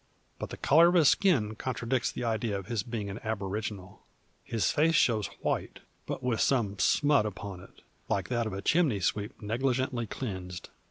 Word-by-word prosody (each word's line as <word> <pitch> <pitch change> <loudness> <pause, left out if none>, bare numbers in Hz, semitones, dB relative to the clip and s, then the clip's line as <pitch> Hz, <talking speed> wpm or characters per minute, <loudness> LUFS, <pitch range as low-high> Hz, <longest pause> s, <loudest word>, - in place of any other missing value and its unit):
But - - -5
the - - -7
colour 165 +4 +6
of 175 - +2
his 160 -5 +6
skin 135 - +2
contradicts 125 +1 -2
the - - -5
idea 110 -2 -1
of 95 - -7
his 115 -1 -1
being 110 -2 -4
an 100 - -6
aboriginal. 105 -2 -4 0.4
His 115 -2 0
face 165 +2 +3
shows 110 -7 +3
white, - - -2 0.3
but - - -4
with 125 -3 0
some 105 -7 +1
smut 145 -7 +3
upon 100 -2 -7
it, 95 - -16 0.3
like - - 0
that 120 -2 0
of 110 - -5
a 100 +1 -5
chimney 155 - +2
sweep 105 +3 -2
negligently 125 +1 -1
cleansed. 95 -7 -6
115 Hz, 175 wpm, -29 LUFS, 100-130 Hz, 0.4 s, colour